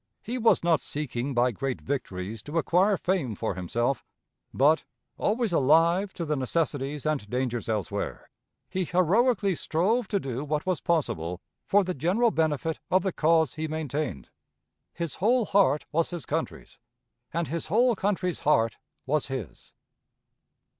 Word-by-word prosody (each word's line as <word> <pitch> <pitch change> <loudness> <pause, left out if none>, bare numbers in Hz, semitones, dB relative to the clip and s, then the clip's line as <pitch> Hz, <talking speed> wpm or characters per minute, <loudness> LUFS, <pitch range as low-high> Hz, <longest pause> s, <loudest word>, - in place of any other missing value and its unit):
He 245 +3 -3
was 230 -5 +4
not 165 -3 +3
seeking 140 -2 -3
by 125 +1 +3
great 130 +4 -3
victories 110 -6 -4
to 150 +9 -5
acquire 185 +5 +3
fame 170 - -1
for - - -2
himself; 120 +9 -1 0.5
but, 150 +4 +3 0.3
always 220 -2 0
alive 165 +7 +4
to 170 - -3
the 150 -1 0
necessities 145 0 -1
and 150 -9 -1
dangers 125 -1 -2
elsewhere, 105 -5 -3 0.4
he 185 - -2
heroically 195 +4 +2
strove 195 +9 0
to 200 - 0
do 135 -3 -4
what 150 0 -2
was 185 -2 0
possible 90 - -1 0.3
for 205 0 +4
the 185 0 -2
general 185 - +2
benefit 160 -1 0
of 185 0 +3
the 190 -3 -1
cause 160 -3 +3
he 160 0 -3
maintained. 150 - -3 0.6
His 170 -3 -5
whole 235 +4 +3
heart 185 -9 +3
was 165 +2 +1
his 175 -7 -5
country's, - - -4 0.5
and 165 -2 -2
his 165 +2 -3
whole 235 +6 +3
country's 190 -3 -1
heart 115 -7 +2 0.3
was 145 +2 0
his. 120 - -7
160 Hz, 145 wpm, -27 LUFS, 135-185 Hz, 0.6 s, was